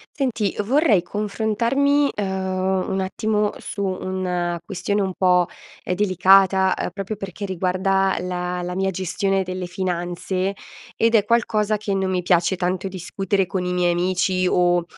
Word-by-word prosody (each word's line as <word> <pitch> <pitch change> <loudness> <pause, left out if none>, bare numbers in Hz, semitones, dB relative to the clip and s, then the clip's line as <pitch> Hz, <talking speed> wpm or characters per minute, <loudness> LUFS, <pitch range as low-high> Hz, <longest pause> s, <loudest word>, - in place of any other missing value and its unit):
Senti, 240 -8 -1
vorrei 255 - +3
confrontarmi, 230 +9 +1
uhm, 190 -1 -1
un 190 - -1
attimo 210 +2 0
su 200 - -6
una 180 -2 -2
questione 200 +2 -1
un 190 -1 -1
po', 180 -1 +3 0.4
uhm, - - -1
delicata, 190 0 +4
uhm, - - -2
proprio 195 +3 -5
perché 195 0 -6
riguarda 190 +1 +1
la 180 0 -3
la 180 0 -4
mia 190 +1 0
gestione 195 +2 -1
delle 185 0 -4
finanze 180 +1 -2 0.4
ed 230 +1 +3
è 210 - +5
qualcosa 215 -1 +1
che 205 -1 -3
non 190 -1 0
mi 180 -1 0
piace 175 +1 +2
tanto 185 +1 -1
discutere 195 +1 -1
con 185 0 -3
i 180 - -2
miei 180 -1 +2
amici 185 +1 +1
o, 175 -1 +3
190 Hz, 150 wpm, -22 LUFS, 180-205 Hz, 0.4 s, è